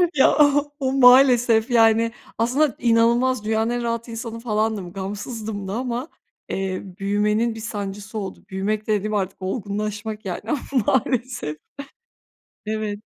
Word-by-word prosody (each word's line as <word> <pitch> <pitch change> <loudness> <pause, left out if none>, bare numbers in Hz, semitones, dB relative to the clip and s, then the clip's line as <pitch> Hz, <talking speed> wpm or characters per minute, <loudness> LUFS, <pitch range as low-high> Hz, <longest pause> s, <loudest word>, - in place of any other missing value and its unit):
Ya 270 - +5
o 290 0 +3
o 265 -1 0
maalesef, 250 -3 +6
yani, 225 0 +4 0.3
aslında 255 +5 +2
inanılmaz 235 +1 +3
dünyanın 220 +1 +1
en 240 0 -2
rahat 230 0 -2
insanı 230 0 -6
falandım, 215 -5 -1
gamsızdım 205 +1 -5
da 195 - -4
ama, 250 +3 -3 0.4
eee, 190 -1 -2 0.2
büyümenin 210 +3 +1
bir - - -7
sancısı 205 -1 -5
oldu. 195 -2 -6
Büyümek 205 +3 -2
dediğim, 215 0 0
artık 195 -2 -2
olgunlaşmak, 210 +1 -4
yani, 180 - -4
ama 295 -4 0 0.3
maalesef. 245 - 0 1.1
Evet. 215 -1 -2
220 Hz, 130 wpm, -22 LUFS, 205-240 Hz, 1.1 s, maalesef